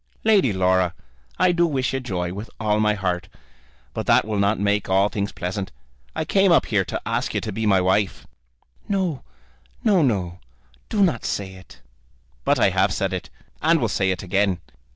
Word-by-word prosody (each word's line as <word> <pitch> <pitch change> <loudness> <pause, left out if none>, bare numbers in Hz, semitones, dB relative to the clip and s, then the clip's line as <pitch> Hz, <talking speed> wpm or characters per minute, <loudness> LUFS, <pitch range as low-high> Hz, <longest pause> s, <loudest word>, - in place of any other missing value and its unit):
"Lady 205 - +4
Laura, 95 -2 +2 0.4
I 185 0 +4
do 170 0 +2
wish 135 -5 -1
you 135 - 0
joy, 90 -8 -3
with 105 +3 -7
all 105 -1 +1
my 105 0 +2
heart, 90 -3 -2 0.7
but - - -4
that - - +4
will 105 -2 -2
not 100 +2 +2
make 100 0 0
all 95 +2 +3
things 100 -2 -3
pleasant. 95 +2 -4 0.4
I 160 - -2
came 195 +2 +3
up 170 - +5
here 105 -4 +1
to - - -4
ask - - -2
you - - 0
to 110 - -4
be 110 +2 -2
my 95 -2 +4
wife." 95 +2 0 0.6
"No; 185 -8 -1 0.6
no, 205 -7 +4
no; 95 - 0 0.5
do 205 -2 +2
not 160 - +1
say 95 -2 -3
it." 95 0 -15 0.6
"But - - +2
I - - +3
have 95 +1 +2
said 95 -1 -1
it, 90 - -5 0.3
and 165 +1 +4
will 120 - +1
say 100 -2 0
it 95 0 -2
again. 95 0 +1
105 Hz, 190 wpm, -23 LUFS, 95-135 Hz, 0.7 s, up